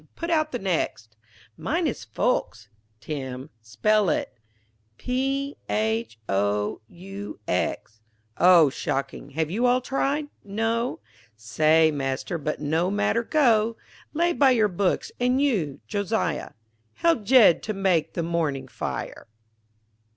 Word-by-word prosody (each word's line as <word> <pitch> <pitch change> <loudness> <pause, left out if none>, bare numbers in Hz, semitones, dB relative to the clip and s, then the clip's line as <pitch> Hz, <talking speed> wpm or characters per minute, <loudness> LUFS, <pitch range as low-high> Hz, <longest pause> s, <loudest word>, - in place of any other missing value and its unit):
Put 335 0 -4
out 310 -1 +1
the 245 - -2
next 165 - -2 0.4
Mine - - -1
is - - -3
folks. - - -1 0.3
Tim, 130 +2 -6
spell 195 - +1
it 150 - -1 0.6
P,_H_,_O_,_U_,_X_. 250 - -2 2.2
O 175 -4 +7
shocking. 135 0 -4
Have 155 +2 -2
you 235 +6 +1
all 250 +1 +4
tried? 275 +3 -1 0.2
No. 225 +4 -2 0.3
Say 155 +9 +3
Master, 140 +4 -3
but 150 +1 -3
no 160 +4 0
matter, 205 +3 +1
go 230 -6 +2 0.3
Lay 345 +3 +1
by 280 -4 +4
your 225 -4 +4
books 185 +1 -1
and 250 +2 +2
you, 200 - 0
Josiah, 200 - -2 0.4
Help 335 -8 +2
Jed 225 -6 +6
to 215 - -3
make 185 -5 +1
the 170 - -1
morning 155 -6 -1
fire. - - -5
195 Hz, 115 wpm, -25 LUFS, 155-245 Hz, 2.2 s, O